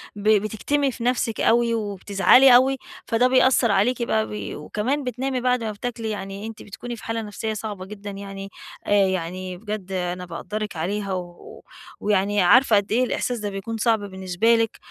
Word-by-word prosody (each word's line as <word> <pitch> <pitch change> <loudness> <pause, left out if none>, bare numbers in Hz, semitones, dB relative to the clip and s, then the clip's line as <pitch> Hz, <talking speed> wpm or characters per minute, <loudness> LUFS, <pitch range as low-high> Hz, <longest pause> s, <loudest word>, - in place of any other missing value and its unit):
ب 205 +1 0
بتكتمي 220 +7 +1
في 235 - -8
نَفسِك 240 -2 0
أوي 235 0 +3
وبتزعلي 210 +4 +5
أوي، 265 +2 +4 0.3
فده 235 +2 +3
بيأثر 255 -2 +4
عليكِ 235 +5 +2
بقى 220 -2 0
ب 210 - -5
وكمان 265 +8 -2
بتنامي 255 +1 -2
بعد 250 -1 +1
ما 220 - -2
بتاكلي، 225 +1 -5
يعني 200 0 -5
أنتِ 225 -1 -9
بتكوني 240 +4 -7
في 225 - -13
حالة 225 0 -2
نفسية 220 +1 -4
صعبة 210 -3 -6
جدًا 205 +1 -8
يعني، 195 0 -8 0.4
آآ - - -2 0.2
يعني 185 0 -3
بجد 210 -1 -6
أنا 180 -1 -3
باقدرِك 210 +5 -5
عليها 195 +4 -2
و 175 -1 -8 0.4
ويعني 205 0 +1
عارفة 230 +6 +5
قدّ 200 0 +1
إيه 240 +4 +3
الإحساس 245 -1 -1
ده 210 -1 -3
بيكون 200 +3 -5
صعب 225 0 +2
بالنسبة 190 +2 +1
لِك، 225 -1 0
215 Hz, 175 wpm, -23 LUFS, 195-235 Hz, 0.4 s, وبتزعلي